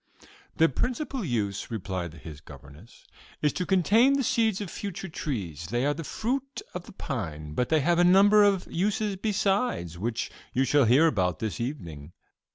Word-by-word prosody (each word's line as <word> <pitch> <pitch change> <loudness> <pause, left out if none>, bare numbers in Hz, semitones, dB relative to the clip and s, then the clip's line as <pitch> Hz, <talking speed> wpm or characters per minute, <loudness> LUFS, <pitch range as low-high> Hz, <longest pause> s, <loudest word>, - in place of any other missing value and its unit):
"Their 165 - +5
principal 255 - -2
use," 105 - -2
replied 95 -6 -4
his 75 -2 -10
governess, 75 - -15 0.4
"is 150 - +2
to 180 - -3
contain 210 - +4
the 275 -1 +1
seeds 230 -5 +1
of 200 -4 -5
future 195 -1 -5
trees: 95 - -5
they 120 +6 0
are 145 - +2
the 165 +3 -6
fruit 265 - -3
of 180 -1 -6
the - - -10
pine; 80 - -5
but 125 +9 -1
they 155 -1 +3
have 170 +4 +2
a - - +6
number 200 +4 +6
of 200 -3 +2
uses 205 +3 -1
besides, 195 - -1
which 115 +3 -2 0.2
you 130 - +2
shall 140 0 +3
hear 130 +8 +5
about 90 - +1
this 110 +4 -4
evening." 85 - -6
150 Hz, 170 wpm, -27 LUFS, -, 0.4 s, a